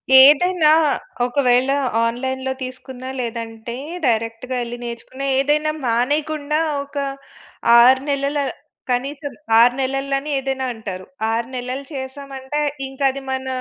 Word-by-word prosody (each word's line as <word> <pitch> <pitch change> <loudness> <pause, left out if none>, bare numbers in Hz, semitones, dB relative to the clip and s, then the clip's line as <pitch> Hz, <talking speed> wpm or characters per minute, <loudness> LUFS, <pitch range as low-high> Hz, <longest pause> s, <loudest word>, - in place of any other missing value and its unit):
ఏదైనా, 305 +5 +7 0.6
ఒకవేళ 250 0 +2 0.3
ఆన్‌లైన్‌లో 260 +3 -2
తీసుకున్న 255 0 -7
లేదంటే, 230 -1 -5 0.3
డైరెక్ట్‌‌గా 230 +2 -1
ఎళ్లి 240 0 -6
నేర్చుకున్న, 240 +3 -7 0.2
ఏదైనా 300 +2 +2
మానేయకుండా 295 +5 0 0.2
ఒక 280 +1 -18 0.8
6 260 +2 +6
నెలల, 280 +1 0 0.5
కనీసం 280 +3 -2 0.3
6 240 +1 +6
నెలలు 270 +1 -1
అని 295 +2 -7
ఏదైనా 265 -1 -2
అంటారు. 190 -4 -7 0.2
6 230 +1 -1
నెలలు 255 +2 -4
చేసామంటే, 270 +1 -5 0.3
ఇంక 270 +1 -13
అది 275 0 -7
మన 265 0 -3
265 Hz, 110 wpm, -20 LUFS, 245-280 Hz, 0.8 s, ఏదైనా